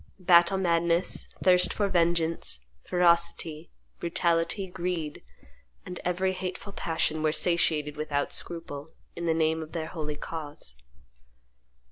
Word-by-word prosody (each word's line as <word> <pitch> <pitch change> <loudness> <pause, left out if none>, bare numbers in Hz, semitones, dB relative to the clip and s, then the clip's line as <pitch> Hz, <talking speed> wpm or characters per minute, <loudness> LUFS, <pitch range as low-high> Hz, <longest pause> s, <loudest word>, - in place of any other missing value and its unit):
Battle 175 0 +5
madness, 170 -1 +2 0.2
thirst 180 -1 +5
for 205 - +1
vengeance, 170 - +1 0.2
ferocity, 170 -2 +2 0.3
brutality, 170 +3 0
greed, 175 -4 -4 0.6
and 180 - -7
every 185 +1 0
hateful 185 +2 -6
passion 160 -3 -1
were 155 0 +2
satiated 155 -3 +1
without 145 -2 -2
scruple, 160 -3 -4 0.3
in 170 0 -4
the 160 - +2
name 160 0 +1
of 155 0 -9
their 160 -2 -3
holy 150 -3 -4
cause. 145 - -7
170 Hz, 115 wpm, -28 LUFS, 155-180 Hz, 0.6 s, Battle